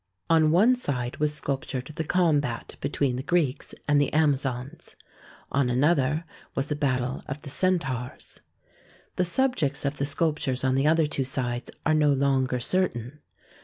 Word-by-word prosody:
On 160 Hz, -2 st, +5 dB
one 210 Hz, +10 st, +5 dB
side 125 Hz, -, -3 dB
was 150 Hz, 0 st, +1 dB
sculp 140 Hz, -2 st, -3 dB
tured 130 Hz, +3 st, -5 dB
the 160 Hz, -, -3 dB
combat 150 Hz, -8 st, 0 dB
between 140 Hz, -2 st, 0 dB
the -, -, -2 dB
Greeks 150 Hz, -3 st, -1 dB
and 145 Hz, -1 st, +4 dB
the 145 Hz, -, 0 dB
Amazons. 140 Hz, -4 st, -1 dB, 0.6 s
On 140 Hz, -2 st, +1 dB
another 145 Hz, +4 st, +2 dB, 0.3 s
was 135 Hz, +1 st, -1 dB
the 150 Hz, -, 0 dB
battle 130 Hz, -3 st, -1 dB
of 140 Hz, +2 st, -6 dB
the 140 Hz, -, -3 dB
Centaurs. 135 Hz, -9 st, -2 dB, 0.8 s
The 180 Hz, -, +3 dB
subjects 170 Hz, -, +1 dB
of 140 Hz, +1 st, -1 dB
the 140 Hz, -, 0 dB
sculptures 145 Hz, -3 st, -1 dB
on 130 Hz, -1 st, +2 dB
the 135 Hz, +2 st, +2 dB
other 160 Hz, 0 st, +4 dB
two 145 Hz, -2 st, -1 dB
sides 125 Hz, -2 st, -2 dB, 0.2 s
are 155 Hz, -, +3 dB
no 150 Hz, -1 st, +4 dB
longer 135 Hz, -2 st, +1 dB
certain. 135 Hz, -3 st, -1 dB
145 Hz, 160 wpm, -26 LUFS, 130-155 Hz, 0.8 s, On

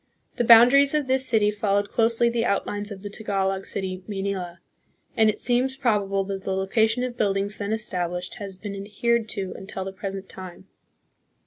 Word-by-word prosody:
The -, -, +1 dB
bounda 235 Hz, +2 st, +8 dB
ries 280 Hz, +1 st, +5 dB
of 300 Hz, -2 st, +1 dB
this 260 Hz, 0 st, +2 dB
city 215 Hz, -3 st, +3 dB
followed 205 Hz, -1 st, 0 dB
closely 230 Hz, +1 st, +2 dB
the 235 Hz, -1 st, 0 dB
outlines 205 Hz, -1 st, -1 dB
of 195 Hz, -1 st, -8 dB
the 205 Hz, -, -5 dB
Tagalog 195 Hz, -2 st, -2 dB
city 185 Hz, -1 st, -4 dB
" -, -, -17 dB
Maynila," 195 Hz, -3 st, -3 dB, 0.6 s
and 220 Hz, -1 st, +4 dB
it 210 Hz, -, -2 dB
seems 260 Hz, +2 st, +1 dB
probable 205 Hz, -6 st, +1 dB
that 195 Hz, 0 st, -5 dB
the 190 Hz, -, -2 dB
location 220 Hz, +5 st, +1 dB
of 250 Hz, -1 st, -3 dB
buildings 200 Hz, 0 st, -1 dB
then 205 Hz, 0 st, -3 dB
established 180 Hz, -5 st, -3 dB
has 200 Hz, -2 st, -6 dB
been 200 Hz, +1 st, -7 dB
adhered 215 Hz, +3 st, -1 dB
to 190 Hz, -3 st, -4 dB
until 190 Hz, 0 st, -6 dB
the 190 Hz, -, -6 dB
present 195 Hz, 0 st, -6 dB
time. 185 Hz, 0 st, -9 dB
205 Hz, 185 wpm, -24 LUFS, 195-230 Hz, 0.6 s, bounda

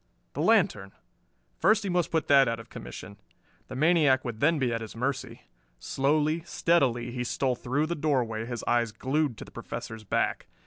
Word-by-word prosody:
The -, -, -3 dB
lantern! 95 Hz, 0 st, +2 dB, 0.7 s
First 215 Hz, 0 st, +3 dB
he 200 Hz, -, -2 dB
must 175 Hz, -1 st, +1 dB
put 160 Hz, -2 st, 0 dB
that 140 Hz, -2 st, +6 dB
out 115 Hz, 0 st, -1 dB
of 115 Hz, +1 st, -13 dB
commission. 60 Hz, +11 st, -9 dB, 0.5 s
The -, -, -8 dB
maniac 150 Hz, -3 st, +3 dB
would 115 Hz, -3 st, -5 dB
then 160 Hz, +5 st, +3 dB
be 125 Hz, -4 st, 0 dB
at 115 Hz, -, -2 dB
his 110 Hz, -, -8 dB
mercy. 130 Hz, -1 st, -3 dB, 0.3 s
Slowly, 150 Hz, -, 0 dB
steadily 130 Hz, -10 st, +1 dB
he 125 Hz, 0 st, -3 dB
stole 130 Hz, +1 st, 0 dB
through 130 Hz, +5 st, -1 dB
the 170 Hz, -, -2 dB
doorway, 125 Hz, -8 st, -1 dB
his 120 Hz, -2 st, -5 dB
eyes 120 Hz, -2 st, +1 dB
glued 135 Hz, +2 st, -1 dB
to -, -, -8 dB
the -, -, -15 dB
Professor's 110 Hz, -1 st, -7 dB
back. 100 Hz, -, -1 dB
130 Hz, 180 wpm, -28 LUFS, 115-155 Hz, 0.7 s, that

